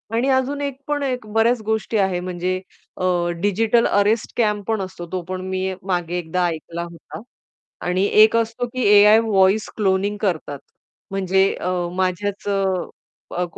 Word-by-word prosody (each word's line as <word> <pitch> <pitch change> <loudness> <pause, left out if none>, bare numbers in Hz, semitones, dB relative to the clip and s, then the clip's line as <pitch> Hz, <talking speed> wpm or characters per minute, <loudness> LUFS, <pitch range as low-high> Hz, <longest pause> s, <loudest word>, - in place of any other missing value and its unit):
आणि 240 +4 +1
अजून 265 +2 +1
एक 280 -2 -3
पण 295 -1 -1
एक 250 -4 -2
बऱ्याच 225 +1 +3
गोष्टी 220 +1 -1
आहे. 190 -3 +1
म्हणजे 180 +1 -3 0.4
अ, - - -4 0.4
डिजिटल 220 +4 +2
अरेस्ट 205 +2 +2
स्कॅम 210 -3 0
पण 220 -2 0
असतो, 185 -2 -7
तो 185 - -1
पण 185 0 -3
मी 190 0 -2
मागे 175 -2 -1
एकदा 175 +2 -1
ऐकला 170 +1 -5
होता. 170 +4 -11 0.7
आणि 180 +2 +1 0.2
एक 220 +1 +5
असतो, 230 +1 -1
की 255 +2 -4
एआय 210 +1 +7
व्हॉइस 205 -1 +2
क्लोनिंग 200 0 +1
करतात. 160 -8 -2 0.5
म्हणजे 190 0 +2
अ, 180 - -3 0.3
माझ्याच 190 +2 -2
अ, 195 -1 +1 0.7
अ, 180 - 0
200 Hz, 155 wpm, -21 LUFS, 185-225 Hz, 0.7 s, एआय